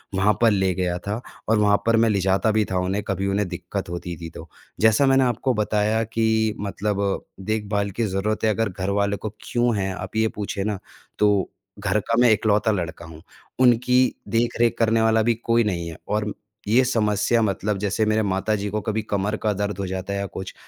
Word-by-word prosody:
वहाँ 105 +2 +3
पर 115 -2 +5
ले 95 -2 +1
गया 90 -1 -1
था 105 +4 -2 0.3
और 110 - +4
वहाँ 100 -1 +4
पर 115 0 +4
मैं 115 0 +4
ले 100 - +1
जाता 95 +4 +2
भी 110 -1 +2
था 95 - 0
उन्हें 95 +3 -1
कभी 95 0 -1
उन्हें 100 0 0
दिक्कत 90 +1 -5
होती 85 0 -5
थी 85 - -6
तो, - - -11 0.3
जैसा 110 +5 +4
मैंने 135 0 +4
आपको 125 +1 0
बताया 105 +1 +1
कि 110 -1 +1
मतलब 100 -1 -2
देखभाल 100 0 -1
की - - +3
ज़रूरत 105 +3 -2
है 110 - +4
अगर 115 +1 0
घरवाले 100 +2 -1
को 110 - -5
क्यों 120 -1 +1
है, 95 -1 -1
आप 95 +4 -7
ये 110 0 +3
पूछें 100 -1 -3
ना 105 -3 -2 0.4
तो 105 -2 +3 0.3
घर 100 +1 +1
का 115 - +3
मैं 125 - +6
इकलौता 105 +1 +2
लड़का 85 -4 -4
हूँ। 80 0 -12 0.4
उनकी 125 +1 +4
देख-रेख 115 +1 +1
करने 115 0 +3
वाला 110 0 +3
भी 120 +1 +3
कोई 115 0 +1
नहीं 85 -5 -2
है 80 - -9
और 105 0 0
म 105 - -3 0.3
ये 120 +5 +4
समस्या 115 -1 +1
मतलब 105 -1 0
जैसे 105 +2 0
मेरे 110 +1 +2
माताजी 100 +1 -1
को 105 0 -1
कभी 110 -1 -2
कमर 100 +1 0
का 105 - +2
दर्द 100 0 -3
हो 100 - -1
जाता 95 +1 -4
है 100 - -2
या 100 - -2
कुछ, 95 -1 -7
105 Hz, 210 wpm, -23 LUFS, 95-110 Hz, 0.4 s, मैं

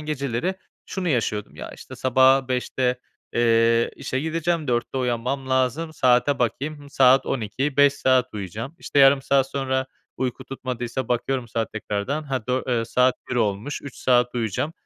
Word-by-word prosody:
geceleri 150 +2 -2 0.3
şunu 185 -2 -3
yaşıyordum: 110 -7 -1
"Ya, - - -7
işte, - - -11
sabaha 130 +1 +4
05.00'te, 125 0 -1 0.3
eee, 115 0 +3
işe 130 - -3
gideceğim, 160 0 -1
04.00'te 120 +2 -1
uyanmam 125 +2 -2
lazım. 130 +5 0
Saate 130 0 +3
bakayım, 140 +6 -2
hımm, 145 -1 -14
saat 135 -1 +5
00.00 130 +4 -2
5 145 -1 +6
saat 130 -2 +2
uyuyacağım." 105 - -6
İşte, - - -2
yarım 135 0 +6
saat 135 -1 +2
sonra 130 -1 -1 0.3
uyku 130 -2 -3
tutmadıysa 125 -1 -4
bakıyorum 125 0 -1
saat 115 0 -3
tekrardan, 110 +7 -3
"Ha, 130 -6 -4
dö 130 +1 0
eee, 120 -2 0
saat 125 +2 +2 0.2
01.00 - - -1
olmuş, 105 +5 -1
3 140 - -9
saat 125 -1 +2
uyuyacağım." 120 - -2
130 Hz, 155 wpm, -23 LUFS, 120-140 Hz, 0.3 s, 5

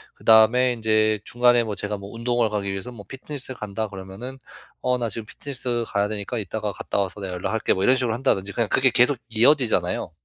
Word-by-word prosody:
그다음에 115 +3 +5
인제 110 -2 +2
중간에 120 0 +3
뭐 110 -2 -4
제가 105 +2 -3
뭐 100 +1 -10
운동을 120 -1 0
가기 100 -2 -2
위해서 95 +6 -5
뭐 105 -4 -11
피트니스 135 -1 -7
간다 105 0 -4
그러면은 100 +7 -8 0.4
"어, 125 0 +1
나 115 -2 -1
지금 110 +2 -6
피트니스 125 -2 -4
가야 100 0 0
되니까 105 +3 -4
이따가 105 +1 -3
갔다 100 - -3
와서 100 +1 -2
내가 95 -2 -4
연락할게." 100 +5 0
뭐 95 - -3
이런 130 +4 +5
식으로 120 -4 0
한다든지 100 -6 0
그냥 115 -3 -1
그게 130 -1 +4
계속 125 +3 +4
이어지잖아요. 115 - +2
110 Hz, 470 characters per minute, -23 LUFS, 100-125 Hz, 0.4 s, 그다음에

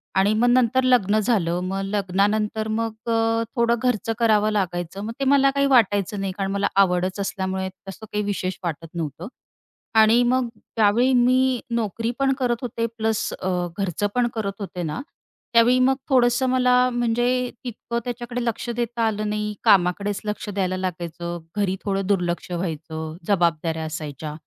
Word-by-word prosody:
आणि 195 +2 +3
मग 225 +3 +2
नंतर 255 +1 +3
लग्न 215 -5 +3
झालं. 190 -6 +1
मग 190 +1 -2
लग्नानंतर 205 +2 0
मग 225 -1 -2 0.2
अ, 225 0 +2
थोडं 235 -1 +3
घरचं 225 -2 0
करावं 215 -2 +3
लागायचं, 180 -2 -2
मग 225 - -4
ते 275 - 0
मला 275 0 +4
काही 280 0 +3
वाटायचं 205 -3 +2
नाही, 195 -1 -2
कारण 195 -1 -2
मला 200 0 +1 0.2
आवडच 185 +1 -1
असल्यामुळे 190 -1 -2 0.2
तसं 205 +3 -9
काही 210 0 -1
विशेष 190 -2 -2
वाटत 165 -1 -4
नव्हतं. 165 +1 -5 0.7
आणि 220 +2 +6
मग 250 0 +2 0.3
त्यावेळी 230 +4 +3
मी 255 +1 +3 0.2
नोकरी 225 0 -1
पण 270 0 +3
करत 245 -2 +1
होते 230 -2 -2
प्लस 220 0 0
अ, 185 - -2 0.3
घरचं 195 0 -1
पण 245 -1 +3
करत 210 -3 -2
होते 180 -3 -5
ना, 155 +7 -3 0.5
त्यावेळी 235 +2 +5
मग 260 +1 +4
थोडंसं 250 -1 +3
मला 250 -1 +3 0.2
म्हणजे 240 0 +1 0.4
तितकं 235 -1 -4
त्याच्याकडे 245 0 -4
लक्ष 235 +1 -3
देता 235 0 -2
आलं 215 -1 -2
नाही 210 0 -2
कामाकडेच 195 +2 +3
लक्ष 210 0 -4
द्यायला 190 -2 -1
लागायचं. 175 -2 -4 0.2
घरी 195 -2 +1
थोडं 195 -1 -1
दुर्लक्ष 175 -4 -1
व्हायचं. 160 -2 -4
जबाबदाऱ्या 165 -4 +1
असायच्या. 155 -1 -6
210 Hz, 155 wpm, -23 LUFS, 185-235 Hz, 0.7 s, आणि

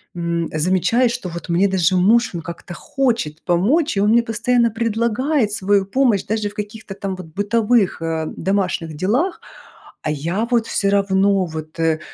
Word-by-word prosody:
м, 170 -1 -2
замечаю, 185 +9 +2
что 235 -6 -4
вот 170 +1 -8
мне 180 +4 +3
даже 185 -2 +1
муж, 220 +7 +3
он 170 - -4
как-то 170 +2 -8
хочет 230 - -2
помочь, 220 - +1
и - - +2
он 205 - +3
мне 235 +1 +4
постоянно 235 +1 +1
предлагает 230 +3 0
свою 200 -1 +1
помощь 230 -1 +2
даже 215 -1 -1
в 205 - -17
каких-то 210 -1 -7
там 195 -2 -4
вот 185 -2 -9
бытовых, 210 +3 +1
э, 160 -1 -2
домашних 180 -4 -1
делах, 245 - 0 0.6
а - - -3
я 170 +10 -2
вот 235 -2 +2
всё 200 - 0
равно 195 -1 +2
вот, 155 -1 -8
э, 160 -1 +1
200 Hz, 170 wpm, -20 LUFS, 170-230 Hz, 0.6 s, мне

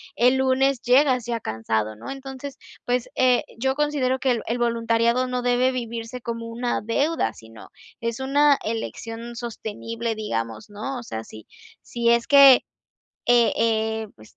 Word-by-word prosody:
el 250 +2 +4
lunes 265 0 +2
llegas 250 -1 +3
ya 235 -1 -1
cansado, 110 - -2
¿no? 105 - -10
Entonces, 270 0 -7 0.3
pues, 245 0 -1
eh, 250 -2 +3 0.2
yo 265 +2 0
considero 285 -3 0
que 260 0 +1
el 235 -2 0
el 235 - -1
voluntariado 235 +1 +1
no 250 0 -2
debe 245 +1 +2
vivirse 235 0 -5
como 230 0 -5
una 240 +1 -2
deuda, 230 - 0
sino 110 0 -14 0.3
es 230 +2 -3
una 285 +1 +4
elección 230 +1 -5
sostenible, 230 0 -5
digamos, 115 - -4
¿no? 215 +6 -5
O 240 - -7
sea, 110 - -6
si 110 -1 -12 0.4
si 235 -1 -1
es 235 0 +3
que, 275 -2 +8 0.6
eh 240 -1 +4
eh, 220 -1 0
pues, 110 - -18
235 Hz, 155 wpm, -23 LUFS, 225-260 Hz, 0.6 s, que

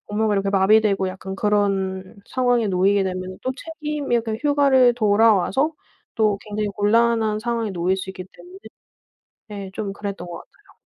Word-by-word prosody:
업무가 210 0 0
이렇게 195 0 0
마비되고 195 0 +3
약간 190 +1 -7
그런 195 -1 -1
상황에 245 -3 +1
놓이게 195 +2 +2
되면은 185 0 -4
또 260 - -1
책임이 300 -4 -4
약간 225 -2 -2
휴가를 275 -4 +4
돌아와서 225 - +3 0.4
또 215 -2 +1
굉장히 210 0 -3
곤란한 220 +1 +2
상황에 230 -1 -2
놓일 180 +1 0
수 190 0 -6
있기 185 -1 -8
때문에 365 +2 -14 0.9
네 200 -2 -7
좀 200 -2 -4
그랬던 200 -3 -6
것 170 -1 -7
같아요. - - -20
210 Hz, 345 characters per minute, -22 LUFS, 195-235 Hz, 0.9 s, 휴가를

